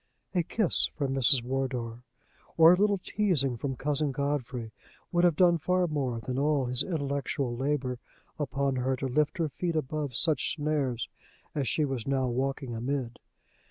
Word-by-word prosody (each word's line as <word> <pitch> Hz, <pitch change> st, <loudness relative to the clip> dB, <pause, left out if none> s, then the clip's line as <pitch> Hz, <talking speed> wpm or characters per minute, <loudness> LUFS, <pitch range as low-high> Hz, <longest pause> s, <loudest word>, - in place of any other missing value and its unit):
A 180 Hz, -, +3 dB
kiss 185 Hz, +3 st, +2 dB
from 140 Hz, -3 st, -1 dB
Mrs. 130 Hz, -1 st, +4 dB
Wardour, 125 Hz, -2 st, -3 dB, 0.6 s
or 165 Hz, +1 st, +9 dB
a -, -, +5 dB
little 200 Hz, +1 st, +2 dB
teasing 180 Hz, -, 0 dB
from 135 Hz, +3 st, -3 dB
Cousin 145 Hz, +2 st, -1 dB
Godfrey, 130 Hz, -4 st, -2 dB, 0.4 s
would 175 Hz, 0 st, +2 dB
have 175 Hz, -3 st, +4 dB
done 175 Hz, 0 st, +4 dB
far 180 Hz, +3 st, +2 dB
more 135 Hz, -7 st, -1 dB
than 125 Hz, +3 st, -3 dB
all 145 Hz, -2 st, +2 dB
his 125 Hz, +1 st, +1 dB
intellectual 140 Hz, -5 st, -2 dB
labor 130 Hz, -1 st, -1 dB, 0.4 s
upon 140 Hz, -2 st, 0 dB
her 130 Hz, +1 st, +1 dB
to 130 Hz, -, -4 dB
lift 150 Hz, +6 st, +1 dB
her 165 Hz, -2 st, +1 dB
feet 170 Hz, +4 st, -2 dB
above 150 Hz, -3 st, -2 dB
such 155 Hz, +3 st, +1 dB
snares 145 Hz, -6 st, -1 dB, 0.5 s
as 140 Hz, -4 st, -1 dB
she 155 Hz, -, +1 dB
was 135 Hz, -4 st, -4 dB
now 135 Hz, -1 st, +1 dB
walking 130 Hz, +1 st, -2 dB
amid. 120 Hz, 0 st, -3 dB
140 Hz, 160 wpm, -29 LUFS, 125-155 Hz, 0.6 s, or